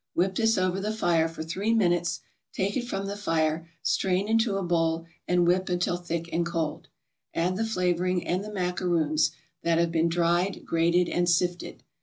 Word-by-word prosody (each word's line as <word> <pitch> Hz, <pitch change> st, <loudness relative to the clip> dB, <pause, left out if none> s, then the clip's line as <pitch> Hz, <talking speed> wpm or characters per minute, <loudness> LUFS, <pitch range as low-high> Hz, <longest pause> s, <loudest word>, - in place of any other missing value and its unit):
Whip 185 Hz, +2 st, +2 dB
this 225 Hz, +2 st, +2 dB
over 185 Hz, 0 st, +1 dB
the 210 Hz, +2 st, -1 dB
fire 170 Hz, -7 st, +2 dB
for 165 Hz, -1 st, -6 dB
three 195 Hz, +8 st, -1 dB
minutes, 175 Hz, -5 st, +1 dB, 0.3 s
take 195 Hz, +1 st, -1 dB
it 240 Hz, -2 st, -2 dB
from 195 Hz, -4 st, -3 dB
the 200 Hz, +1 st, -4 dB
fire, 165 Hz, -4 st, 0 dB
strain 190 Hz, +1 st, +1 dB
into 220 Hz, -2 st, +2 dB
a 195 Hz, -, -2 dB
bowl, 165 Hz, -1 st, 0 dB, 0.2 s
and 175 Hz, -1 st, +3 dB
whip 185 Hz, +2 st, +2 dB
until 175 Hz, 0 st, 0 dB
thick 170 Hz, -1 st, -4 dB
and 170 Hz, -, +2 dB
cold. 165 Hz, -3 st, -3 dB, 0.5 s
Add 180 Hz, +2 st, +1 dB
the 220 Hz, -, -1 dB
flavoring 180 Hz, -3 st, 0 dB
and 185 Hz, +3 st, -1 dB
the 210 Hz, -, -7 dB
macaroons, 175 Hz, -5 st, +1 dB, 0.3 s
that 165 Hz, -1 st, +2 dB
have 170 Hz, 0 st, +2 dB
been 165 Hz, 0 st, +2 dB
dried, 175 Hz, +3 st, +1 dB
grated 170 Hz, +1 st, +2 dB
and 175 Hz, 0 st, +1 dB
sifted. 175 Hz, +1 st, -1 dB
175 Hz, 180 wpm, -27 LUFS, 170-190 Hz, 0.5 s, and